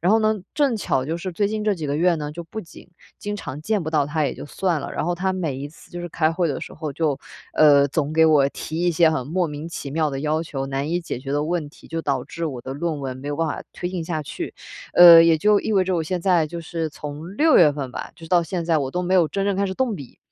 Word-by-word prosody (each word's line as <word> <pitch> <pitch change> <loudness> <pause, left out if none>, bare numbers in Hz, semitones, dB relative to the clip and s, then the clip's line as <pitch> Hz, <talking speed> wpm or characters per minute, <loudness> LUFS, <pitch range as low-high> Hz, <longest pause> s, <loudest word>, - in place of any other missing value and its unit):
然 175 - +2
后 225 - +5
呢 215 0 +2 0.2
正 280 -6 +2
巧 135 -10 0
就 160 +4 -2
是 185 +2 -5
最 200 +4 0
近 215 +1 -2
这 210 - +2
几 160 -4 -5
个 140 - -1
月 175 +2 +3
呢， 150 -1 -5
就 170 +3 -6
不 195 +6 -7
仅 170 - -14 0.3
经 205 0 -4
常 140 -6 -7
见 210 +1 0
不 160 - -3
到 150 -3 +2
他 150 +1 0
也 - - -1
就 - - -8
算 170 0 -1
了， - - -6
然 - - -2
后 175 +2 0
他 190 +2 -1
每 165 -8 -2
一 140 +2 -5
次 155 - -18
就 175 - -6
是 175 - -5
开 160 -1 +1
会 170 0 0
的 145 - -3
时 - - -8
候， 155 -2 -5
就 150 -2 0 0.4
呃， 145 -2 +6
总 150 +1 -1
给 160 0 +5
我 145 -3 +5
提 160 +3 -5
一 175 - +3
些 165 0 +4
很 130 -6 -2
莫 175 +4 0
名 150 +1 -6
其 145 -4 -6
妙 155 +1 0
的 135 - -4
要 155 +2 0
求、 135 -4 -4
难 135 +2 -3
以 175 +1 0
解 165 - -5
决 135 +1 -7
的 145 +1 +1
问 165 -2 -2
题， 145 - -17
就 165 0 -4
导 135 -4 -1
致 170 - -5
我 135 -6 -4
的 130 - -6
论 155 0 -2
文 130 -2 -4
没 135 +2 -7
有 145 - -2
办 165 - 0
法 150 - -4
推 175 - -4
进 180 -2 -4
下 160 -1 -2
去。 145 - -6 0.4
呃， 170 -2 +10
也 165 -1 +4
就 210 +4 +4
意 220 - -2
味 190 -2 +3
着 185 0 0
我 165 - 0
现 180 +3 -2
在 175 -3 +3
就 170 +2 -6
是 165 -1 -3
从 150 +6 -8
6 315 +1 +5
月 160 -4 +7
份 140 -3 -5
吧， - - -6
就 165 - -12
是 - - -11
到 175 -1 +4
现 170 +1 -3
在 165 -1 +2
我 135 -2 -2
都 180 +5 -2
没 180 +1 0
有 175 -4 +4
真 195 +6 -2
正 200 -1 +1
开 200 +1 +1
始 190 - -4
动 255 -4 0
笔。 140 -9 -10
165 Hz, 320 characters per minute, -23 LUFS, 145-180 Hz, 0.4 s, 呃